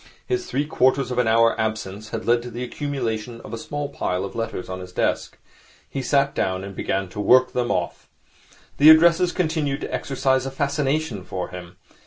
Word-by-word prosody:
His 370 -1 -2
three 145 - -1
quarters 130 -2 +2
of 125 - -1
an 125 - +2
hour 115 +1 +4
absence 110 -1 -4
had - - -5
led 120 0 +3
to 120 - -7
the 120 +2 -5
accumulation 120 -4 -3
of 110 - -10
a - - -3
small 145 +4 -4
pile 95 -9 -2
of 100 - -8
letters 115 -5 -4
on 95 0 -5
his 90 0 -9
desk. - - -1 0.5
He 135 - -4
sat 140 +1 +2
down 95 0 -1
and 100 0 -8
began 95 +1 -1
to 105 - -8
work 125 +5 +4
them 125 -1 0
off. - - -2 0.7
The 150 +2 +8
addresses 170 +2 +6
continued 155 -5 -1
to - - -5
exercise 130 -1 0
a - - -2
fascination 140 -4 -1
for 90 -1 -5
him. 90 -1 -10
125 Hz, 195 wpm, -23 LUFS, 105-145 Hz, 0.7 s, The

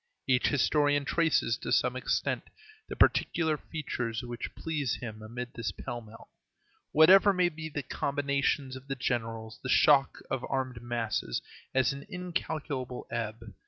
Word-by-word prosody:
Each 125 -1 +3
historian 145 0 +2
traces, 155 -8 +2
to - - -5
some 125 0 +3
extent, 130 - -1 0.4
the - - -4
particular 160 -2 +3
feature 145 -7 -4
which 120 -1 -6
pleases 150 -6 -1
him 110 -3 -7
amid 120 +3 -6
this 115 -3 -3
pell 120 +5 -6
mell. 110 0 -14 0.6
Whatever 190 +6 +7
may 180 -1 +3
be 160 -1 -7
the 145 -1 -4
combinations 140 -1 0
of 130 +1 -10
the 135 - -2
generals, 115 -3 -3
the 130 - -5
shock 140 0 +5
of 130 - -1
armed 130 -3 -2
masses 115 - -2 0.3
has 130 -1 +3
an 140 +4 -9
incalculable 160 - -4
ebb. 115 -1 -4
130 Hz, 145 wpm, -30 LUFS, 120-150 Hz, 0.6 s, Whatever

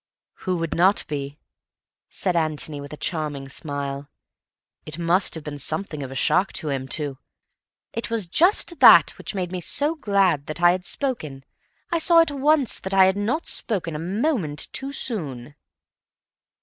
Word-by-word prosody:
"Who 180 - +1
would 165 -1 -3
not 190 +4 +3
be?" 140 -1 -5 0.7
said 185 -3 -1
Antony, 155 -2 -1
with 140 - -10
a 150 - -8
charming 150 -5 -3
smile. 140 -1 -5 0.7
"It 155 +1 -6
must 175 +3 +1
have 160 - -7
been 145 -1 -7
something 155 +1 -4
of 135 -1 -6
a - - -7
shock 185 +8 +2
to 155 - -2
him 135 -2 -3
to—" 140 -1 -2 0.7
"It 230 - -3
was 230 -4 0
just 340 - +2
that - - +8
which - - -6
made 180 -2 -3
me 185 -1 -4
so 290 - 0
glad 195 - +1
that 155 +1 -5
I 175 0 +6
had 180 +1 -3
spoken. 165 - -3 0.5
I 340 - +1
saw 335 +1 +5
at 330 -2 +4
once 285 -1 +2
that 190 +1 -2
I 190 -1 +7
had 190 0 +2
not 225 +11 -1
spoken 180 -8 -2
a - - -4
moment 185 - -1
too 270 +1 -2
soon." 150 - -5
175 Hz, 170 wpm, -23 LUFS, 145-215 Hz, 0.7 s, that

